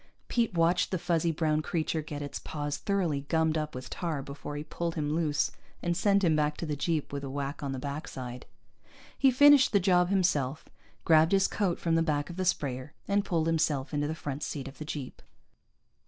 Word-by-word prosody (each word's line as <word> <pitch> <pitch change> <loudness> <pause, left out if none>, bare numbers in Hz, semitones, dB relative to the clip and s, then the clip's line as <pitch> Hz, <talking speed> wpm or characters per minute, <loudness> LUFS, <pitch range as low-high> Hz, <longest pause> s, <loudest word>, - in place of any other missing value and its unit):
Pete 230 -6 +1
watched 170 +2 +3
the 185 - -1
fuzzy 170 -1 +1
brown 155 -1 +1
creature 160 0 -1
get 145 -1 -6
its 145 - -5
paws 145 -1 -4
thoroughly 175 -8 0
gummed 160 -1 +2
up 155 -2 -2
with 130 0 -6
tar 160 -6 -3
before 140 +1 -7
he 145 - -4
pulled 170 +1 -4
him 150 -2 -1
loose 155 -3 +1 0.3
and 175 0 0
sent 200 +2 +3
him 165 -3 +4
back 150 0 +1
to - - -4
the 150 -2 -2
jeep 155 0 -1
with 140 0 -3
a 135 - -4
whack 140 +1 -4
on 140 -2 -3
the 135 - -3
backside. 130 -3 -6 0.7
He 270 - +4
finished 285 0 +6
the 200 - +5
job 180 -1 +3
himself, 155 -7 +1 0.4
grabbed 160 +2 +5
his 195 0 +4
coat 190 -5 0
from 165 - -1
the 165 - +4
back 150 -1 0
of - - -8
the 185 0 -2
sprayer, 140 -4 -1
and 200 0 +2
pulled 170 -5 0
himself 155 -4 0
into 145 0 0
the 160 - -3
front 145 -2 -5
seat 140 -3 -4
of 135 - -11
the 155 - -5
jeep. 145 -4 -6
155 Hz, 210 wpm, -29 LUFS, 145-175 Hz, 0.7 s, finished